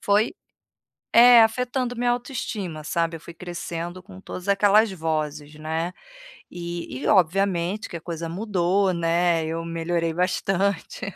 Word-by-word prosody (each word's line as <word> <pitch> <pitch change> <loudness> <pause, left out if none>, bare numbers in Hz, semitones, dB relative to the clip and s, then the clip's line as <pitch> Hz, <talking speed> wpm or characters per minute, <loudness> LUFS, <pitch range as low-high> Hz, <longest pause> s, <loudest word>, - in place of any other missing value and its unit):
foi, 210 - +2 0.8
é, 240 0 +9
afetando 245 +2 0
minha 245 0 +1
autoestima, 215 - -4
sabe? 165 0 -1
Eu - - -12
fui 170 - -11
crescendo 175 0 -6
com 190 -1 -13
todas 185 0 -8
aquelas 205 +2 +4
vozes, 155 -3 -3
né? 160 +3 -3 0.6
E 170 -6 -6
e - - -3
obviamente 190 +1 +2
que 170 - -6
a - - -7
coisa 165 0 -5
mudou, 190 0 +1
né, 170 0 +1
eu 165 +1 -3
melhorei 165 0 -1
bastante. 190 +1 -1
175 Hz, 135 wpm, -24 LUFS, 165-200 Hz, 0.8 s, é